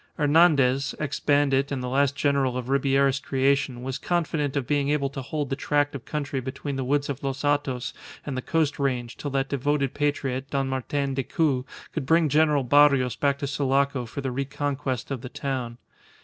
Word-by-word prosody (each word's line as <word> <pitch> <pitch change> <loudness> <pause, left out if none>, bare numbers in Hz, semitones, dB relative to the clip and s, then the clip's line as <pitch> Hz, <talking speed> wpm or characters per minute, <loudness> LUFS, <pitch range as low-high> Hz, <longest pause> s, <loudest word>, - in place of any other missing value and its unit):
Hernandez, 145 -3 +4
ex 150 -2 -3
bandit 140 -1 +2
and 130 -3 -2
the - - -3
last 140 +2 +2
general 140 -4 +1
of 125 0 -5
Ribierist 140 0 +2
creation, 135 -2 0
was 130 +1 -4
confident 160 -5 -1
of 135 - -1
being 145 0 +1
able 140 -2 0
to 135 - -5
hold 145 +1 -4
the - - +1
tract 145 0 0
of 135 -4 -7
country 145 -3 -3
between 135 +2 -5
the 135 - -2
woods 145 +2 0
of 140 -1 -4
Los 135 0 -3
Hatos 145 -4 0 0.3
and 140 - -4
the 130 - -2
coast 155 0 0
range 125 -4 -1
till 145 - -5
that 135 0 0
devoted 140 0 0
patriot, 135 -2 -1
Don 135 -1 0
Martin 135 +1 -2
Decoud, 135 0 0 0.3
could 145 -5 -3
bring 165 0 +4
General 150 -1 +3
Barrios 135 -2 +4
back 140 +1 +1
to 140 - -4
Sulaco 140 -2 0
for 140 - -6
the 135 -1 -2
reconquest 140 -1 -3
of 130 -4 -3
the 125 - -7
town. 130 -4 -4
140 Hz, 190 wpm, -25 LUFS, 130-145 Hz, 0.3 s, Hernandez